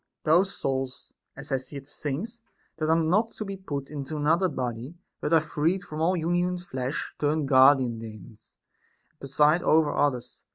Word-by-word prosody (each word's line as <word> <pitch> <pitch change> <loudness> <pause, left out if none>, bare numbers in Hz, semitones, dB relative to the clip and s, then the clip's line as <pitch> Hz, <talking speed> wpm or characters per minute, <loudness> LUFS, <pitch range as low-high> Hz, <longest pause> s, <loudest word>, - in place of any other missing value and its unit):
Those 180 +5 +3
souls 130 -1 -3 0.2
(as - - -9
Hesiod 135 +1 -4
sings) 160 - -5 0.4
that 155 -1 -1
are 160 - +5
not 180 +8 +2
to 215 - -5
be 195 0 -5
put 145 -8 -6
into 145 +1 -5
another 165 +5 +2
body, 125 +1 -4 0.2
but 150 - -3
are 165 - +6
freed 160 +4 -1
from 155 -2 -6
all 180 +3 +2
union 175 +2 +1
with 180 0 -6
flesh, 130 -3 -4
turn 150 0 +1
guardian 130 -3 +5
Daemons 110 0 -12 0.5
and - - -45
preside 150 +5 +3
over 155 -3 +3
others. 125 -4 -1
150 Hz, 165 wpm, -27 LUFS, 135-170 Hz, 0.5 s, are